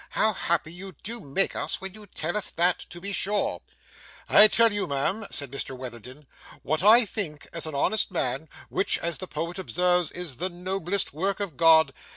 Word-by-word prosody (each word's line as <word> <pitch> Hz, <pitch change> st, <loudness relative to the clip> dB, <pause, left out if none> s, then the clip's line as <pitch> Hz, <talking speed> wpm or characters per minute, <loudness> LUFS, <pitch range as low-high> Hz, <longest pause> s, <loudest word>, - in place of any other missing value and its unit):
'How 220 Hz, 0 st, +2 dB
happy 165 Hz, -3 st, -1 dB
you 190 Hz, +2 st, -10 dB
do 235 Hz, +3 st, -4 dB
make 185 Hz, +5 st, 0 dB
us -, -, -2 dB
when 190 Hz, -1 st, -6 dB
you 210 Hz, -1 st, -14 dB
tell 165 Hz, 0 st, -3 dB
us 210 Hz, -, 0 dB
that, 175 Hz, +1 st, +1 dB
to 175 Hz, -, -9 dB
be 200 Hz, +3 st, -4 dB
sure!' 205 Hz, +2 st, -1 dB, 0.7 s
'I 215 Hz, -, +9 dB
tell 230 Hz, 0 st, +5 dB
you, 205 Hz, -3 st, -1 dB
ma'am,' 170 Hz, +10 st, -2 dB
said 140 Hz, -3 st, -2 dB
Mr 135 Hz, -1 st, -4 dB
Witherden, 125 Hz, +3 st, -9 dB, 0.4 s
'what 155 Hz, +3 st, -1 dB
I 220 Hz, +5 st, +7 dB
think 180 Hz, -8 st, -5 dB
as 165 Hz, -1 st, -1 dB
an 155 Hz, -, -5 dB
honest 215 Hz, +10 st, +1 dB
man, 150 Hz, -4 st, -2 dB, 0.2 s
which, 195 Hz, -, +1 dB
as 170 Hz, 0 st, -3 dB
the 185 Hz, -, -5 dB
poet 170 Hz, +4 st, -5 dB
observes, 180 Hz, -2 st, 0 dB
is 175 Hz, -8 st, -5 dB
the 185 Hz, +2 st, -2 dB
noblest 185 Hz, +1 st, -2 dB
work 190 Hz, +6 st, -2 dB
of 200 Hz, -8 st, -4 dB
God. 160 Hz, -1 st, +5 dB
175 Hz, 190 wpm, -25 LUFS, 155-195 Hz, 0.7 s, I